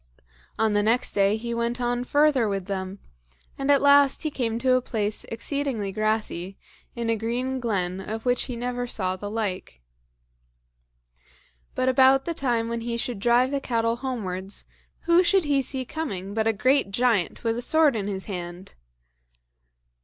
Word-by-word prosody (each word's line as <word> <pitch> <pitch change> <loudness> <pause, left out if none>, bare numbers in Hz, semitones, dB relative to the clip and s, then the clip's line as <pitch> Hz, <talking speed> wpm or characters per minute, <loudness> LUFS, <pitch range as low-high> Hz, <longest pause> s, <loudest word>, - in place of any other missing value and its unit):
On 220 -1 +2
the 205 - +3
next 230 +4 +2
day 200 +1 +2
he 235 +1 -4
went 235 +1 -2
on 245 0 -1
further 285 -4 +3
with 195 -2 -3
them; 190 0 -4 0.6
and 275 +1 -3
at 285 -1 +4
last 280 -1 +5
he 310 - -1
came 230 -5 -2
to 255 +2 +2
a 255 - +3
place 215 -4 -2
exceedingly 230 -3 -3
grassy, 215 -3 -2 0.4
in 235 -1 -3
a 230 - +2
green 245 +4 -2
glen, 190 -6 -1
of 220 +4 -6
which 245 0 +1
he 250 - -5
never 245 +1 -3
saw 185 -5 -2
the 205 +2 -6
like. 205 - -4 2.0
But 255 - 0
about 265 +1 +5
the 335 - -2
time 240 -6 0
when 235 0 -3
he 235 0 -3
should 235 -2 -3
drive 240 +4 +3
the 280 -1 -1
cattle 230 -2 0
homewards, 200 -7 -4 0.4
who 340 +1 +4
should 370 +1 +3
he 285 -2 +2
see 260 -1 -1
coming 200 - -5
but 220 +1 0
a - - +4
great 255 +2 +2
giant 220 -3 0
with 225 -1 0
a - - -4
sword 310 0 +3
in 205 -2 -2
his 190 -2 -4
hand? 180 -1 -7
235 Hz, 170 wpm, -25 LUFS, 205-260 Hz, 2.0 s, last